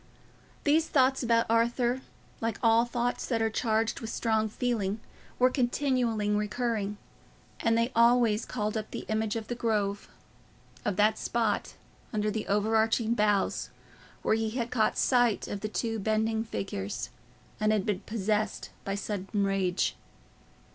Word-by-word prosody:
These 310 +2 +3
thoughts 265 -2 +3
about 230 -2 +3
Arthur, 235 +2 +2 0.4
like 225 -2 -2
all 230 +1 +5
thoughts 240 0 -2
that 230 -3 0
are 225 0 +1
charged 225 0 0
with 225 - -6
strong 220 -1 0
feeling, 215 -3 -1 0.4
were 255 +1 +4
continually 245 -4 +1
recurring, 210 0 -1 0.6
and 230 -1 +2
they 230 +2 +1
always 235 -2 +4
called 215 -2 -3
up 215 -1 -3
the - - -6
image 220 0 0
of 225 -1 -4
the - - -2
Grove—of 210 -2 -4
that 210 +2 +3
spot 225 -3 -1 0.4
under 215 -1 0
the 215 0 -3
overarching 220 +2 +2
boughs 210 -3 +1 0.5
where - - +3
he 220 0 0
had 235 +1 -3
caught 220 -3 +2
sight 245 -4 +3
of 205 - -4
the 215 - -4
two 225 0 -2
bending 220 +1 +1
figures, 120 - -4 0.5
and 215 0 +2
had 210 -3 +1
been 205 -3 0
possessed 215 0 -2
by 195 - -2
sudden 200 0 -2
rage. 195 -2 0
220 Hz, 140 wpm, -29 LUFS, 210-235 Hz, 0.6 s, all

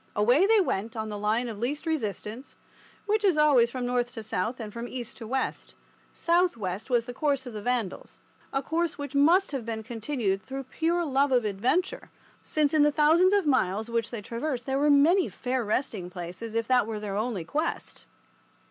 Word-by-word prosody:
Away 245 - +4
they 445 0 +5
went 225 - -1
on 220 -1 -3
the 210 - -4
line 220 +4 0
of 220 -3 -6
least 285 +7 -2
resistance, 230 - -4 0.5
which 425 0 +1
is 375 -6 +3
always 280 -6 +5
from 250 0 -4
north 245 0 0
to 225 - -7
south 220 +4 -2
and 215 -3 -7
from 235 +1 -5
east 245 -3 -7
to 225 - -8
west. 260 +3 -3 0.4
South 345 -3 +1
west 190 +2 -4
was 240 -2 +2
the 245 - -7
course 280 -1 0
of 245 - -8
the 210 - -5
Vandals—a 245 +4 -4
course 335 +3 -1
which 285 -2 -6
must 330 +7 +4
have 270 -4 -3
been 220 -1 -4
continued 225 -4 -2
through 270 +5 -6
pure 335 +6 -1
love 280 -1 +2
of 245 -3 +3
adventure, 255 - -1 0.3
since 300 -1 +1
in 310 - +4
the 295 0 +5
thousands 320 +5 +4
of 400 -4 +3
miles 220 -5 +1
which 230 -1 0
they 230 -4 -6
traversed 245 +3 -3
there 270 0 0
were 295 +1 +3
many 315 +6 +5
fair 255 -1 -2
resting 210 -4 -2
places, 180 +5 -7
if 230 0 0
that 250 -4 +3
were 225 - -4 0.2
only 215 -4 -2
their - - -21
quest. 310 +3 -3
250 Hz, 195 wpm, -27 LUFS, 220-295 Hz, 0.5 s, they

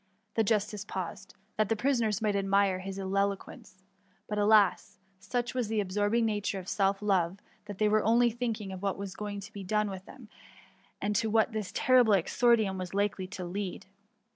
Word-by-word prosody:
^ - - -42 0.3
The 225 - +2
justice 210 -1 0
paused, 190 -1 -6 0.2
that 215 -2 +1
the 225 - +2
prisoners 225 -3 0
might 210 -2 +1
admire 195 -1 +2
his 190 +1 -6
ek^ 195 +1 0
quence; - - -14 0.5
but, 210 -1 -2
alas! 205 -1 +3 0.2
such 240 +4 -2
was 250 -3 -1
the 220 0 -1
absorbing 205 +4 +1
na 215 -2 0
ture 195 -1 -2
of 185 - -10
self 195 0 0
love, 190 -3 +1 0.3
that 205 -2 -8
they 215 - +2
were 215 0 +3
only 235 +2 +4
thinking 225 -4 -3
of 185 -1 -7
what 200 -1 -1
was 200 -1 -6
going 205 -1 -5
to 200 - -11
be 200 - -7
.done 210 +2 0
with 190 0 -8
them, - - -13 0.7
and 210 0 -1
to 225 0 0
what 220 +2 +3
this 215 -3 -4
terrible 250 -3 +4
exordium 210 +1 +2
was 185 0 -5
likely 200 -2 0
to 185 -1 -6
lead. 190 +1 -5
205 Hz, 195 wpm, -30 LUFS, 195-220 Hz, 0.7 s, only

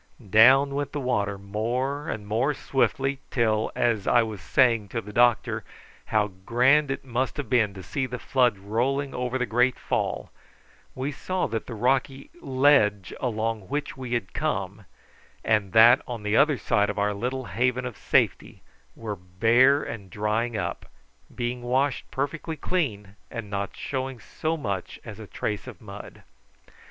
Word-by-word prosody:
Down 135 +6 +6
went 145 0 -3
the 150 - -2
water 105 -6 -1
more 120 +8 -2
and 105 - -4
more 120 +8 0
swiftly 135 0 0
till, 110 -3 +1
as 110 -4 +1
I 120 - +5
was 110 -4 -6
saying 115 0 +3
to 115 - -2
the 105 -1 -9
doctor 120 0 +2 0.4
how 105 -1 +1
grand 135 +7 +4
it 135 - -4
must 130 +2 -2
have 145 - -5
been 110 -5 +2
to 95 - -8
see 130 +9 -2
the 125 0 -5
flood 125 -4 +2
rolling 125 +8 -1
over 125 +1 -2
the 125 - 0
great 125 +2 +2
fall, - - -2 0.6
we 135 +3 -2
saw 185 +6 -2
that 110 0 -3
the 120 - -6
rocky 135 +4 0
ledge 130 -8 +3
along 110 -4 -2
which 145 +2 -3
we 130 -2 -5
had 115 -6 -2
come 100 -9 -3 0.6
and 105 -3 +2
that 115 +4 +7
on 120 -3 -5
the 105 +1 0
other 150 +1 +4
side 105 -2 +1
of 105 - -4
our 105 0 +1
little 125 +5 -3
haven 125 +2 0
of 125 -3 -5
safety - - 0 0.3
were 110 -3 -5
bare 115 +10 +3
and 100 -5 -7
drying 110 +4 -1
up, - - -4 0.5
being 120 +1 -3
washed 130 +2 0
perfectly 150 +4 -3
clean 105 - -2
and 115 -4 -7
not 100 0 -3
showing 130 -2 -4
so 160 +8 -3
much 100 - -4
as - - -9
a - - -9
trace 105 +3 -4
of 115 -9 -9
mud. 105 -1 -11
120 Hz, 165 wpm, -26 LUFS, 105-135 Hz, 0.6 s, that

